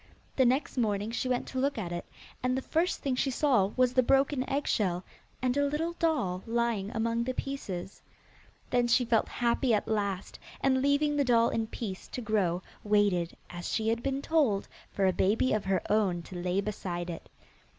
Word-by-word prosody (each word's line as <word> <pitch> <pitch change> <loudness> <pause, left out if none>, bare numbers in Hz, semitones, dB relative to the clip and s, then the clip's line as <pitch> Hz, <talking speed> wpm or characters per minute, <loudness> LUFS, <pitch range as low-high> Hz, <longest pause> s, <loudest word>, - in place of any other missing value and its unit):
The 260 - +4
next 260 +1 +1
morning 210 -1 0
she 255 +2 -2
went 250 -1 0
to 260 - -3
look 275 0 0
at 180 -6 -3
it, 175 0 -5 0.3
and 255 +1 +1
the 265 - -3
first 340 +3 0
thing 275 - 0
she 270 - +1
saw 255 -7 +3
was 255 -1 +3
the 255 - +5
broken 270 +1 +2
eggshell, 200 -10 0 0.4
and 250 0 +2
a 285 - +2
little 320 +4 -1
doll 250 - +1
lying 230 -4 0
among 230 +1 0
the 255 +1 -3
pieces. 200 -10 -5 0.7
Then 245 -1 +3
she 240 +1 +3
felt 225 -2 +2
happy 240 0 +1
at 205 - -2
last, 200 -3 -2 0.2
and 260 -1 +2
leaving 285 +2 +2
the 285 - +3
doll 235 -2 +4
in 225 -1 -1
peace 205 -4 -6
to - - -6
grow, 195 -6 0 0.2
waited, 205 -5 +2
as 175 0 -5
she 220 0 0
had 230 +1 0
been 275 +1 -2
told, 275 -12 +2 0.2
for 195 - 0
a 185 - +3
baby 210 +8 +2
of 215 -2 0
her 190 -2 +1
own 195 -5 +1
to 185 - -10
lay 180 +2 0
beside 175 -4 -4
it. 165 - -9
230 Hz, 190 wpm, -30 LUFS, 195-260 Hz, 0.7 s, the